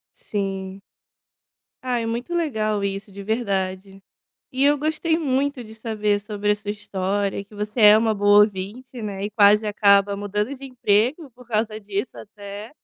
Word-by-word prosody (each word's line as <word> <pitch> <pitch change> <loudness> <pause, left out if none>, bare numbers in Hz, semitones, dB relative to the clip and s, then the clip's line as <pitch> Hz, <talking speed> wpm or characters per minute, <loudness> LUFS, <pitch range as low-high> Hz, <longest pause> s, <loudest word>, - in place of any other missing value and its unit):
Sim. 195 -1 -4 1.0
Ah, 250 -2 -1
é 230 - -2
muito 235 +9 -3
legal 215 -11 0
isso, 195 +1 -4
de 200 +1 -9
verdade, 195 -3 -2 0.5
e 260 +1 +1
eu 290 +1 +5
gostei 310 +2 0
muito 280 -3 -1
de 220 0 -12
saber 215 -2 -1
sobre 210 0 -2
a - - +4
sua 205 0 -6
história, 200 -1 -2
que 200 +2 -18
você 210 +3 -4
é 210 0 +9
uma 220 0 +2
boa 205 0 +5
ouvinte, 210 +5 -2
né. 200 -2 -4
E 205 - -3
quase 210 +1 +5
acaba 200 -1 +4
mudando 210 +5 -2
de 275 0 -11
emprego 255 - +1
por 250 +1 -18
causa 215 -1 -1
disso 205 +3 -4
até, 205 +1 -9
210 Hz, 165 wpm, -23 LUFS, 200-240 Hz, 1.0 s, é